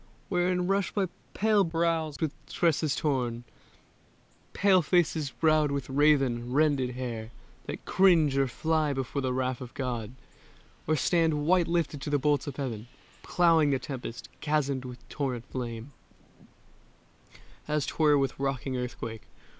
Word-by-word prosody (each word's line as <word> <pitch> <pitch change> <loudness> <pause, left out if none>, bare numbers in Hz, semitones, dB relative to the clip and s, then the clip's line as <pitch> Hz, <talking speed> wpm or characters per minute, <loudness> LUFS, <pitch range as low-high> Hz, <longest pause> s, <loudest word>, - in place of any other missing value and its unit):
Wherein 180 -1 +1
rush 195 +1 0
by 195 -3 -1 0.3
pale 210 -1 +3
brows 165 -3 0
with 155 -2 -1
tresses 160 -4 +1
torn; 125 -5 -1 1.1
Pale 195 -2 +4
faces 160 -3 +1
browed 155 0 +2
with 140 -2 -3
raven, 135 -4 +2
rended 135 -3 +2
hair, 115 -3 -5 0.4
That - - -6
cringe 170 -7 +4
or 135 0 +2
fly 155 +3 0
before 135 +1 -3
the 130 -1 -1
wrath 130 0 -1
of 125 -1 -9
God, 120 -4 -3 0.7
Or 155 - +3
stand 160 0 +1
white 175 +1 +3
lifted 165 -4 -1
to - - -4
the 145 - +2
bolts 145 +1 +1
of 140 - -5
Heaven, 120 -6 -4 0.3
Ploughing 165 -4 +3
the 135 - +2
tempest, 125 -3 -7
chasmed 140 -4 0
with 125 -1 -10
torrent 130 -5 -3
flame 120 0 -5 1.8
As 150 -2 0
'twere 150 +1 +3
with 135 -2 -1
rocking 135 -1 -2
earthquake. 115 -3 -6
145 Hz, 140 wpm, -28 LUFS, 130-160 Hz, 1.8 s, Pale